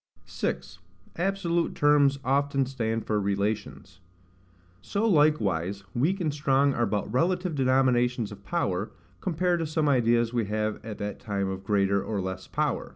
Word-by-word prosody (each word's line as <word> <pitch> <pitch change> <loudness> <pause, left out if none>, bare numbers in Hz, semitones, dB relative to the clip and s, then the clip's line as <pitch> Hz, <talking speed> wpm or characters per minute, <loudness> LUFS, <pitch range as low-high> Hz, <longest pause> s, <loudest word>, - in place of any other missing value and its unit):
6. 90 0 -4 0.4
Absolute 175 -2 0
Terms 145 -1 +4
often 140 +1 +1
stand 115 -4 -2
for 105 -1 0
Relations. 100 -2 -3 0.8
So 205 - -1
likewise 100 - +2
weak 165 +11 +1
and 155 -5 -1
strong 140 -1 +2
are 120 -2 +1
but 105 0 -2
relative 180 +5 +1
denominations 125 -4 +2
of 100 -1 -11
power, 100 - -1 0.3
compared 180 0 0
to 165 - -2
some 155 0 0
ideas 120 -3 +2
we 120 -3 +1
have 110 +1 -2
at 110 -2 -6
that 105 0 -5
time 100 -2 -2
of 95 0 -5
greater 100 -1 +1
or 105 -3 -3
less 95 0 -5
power. - - -1
125 Hz, 150 wpm, -27 LUFS, 105-150 Hz, 0.8 s, Terms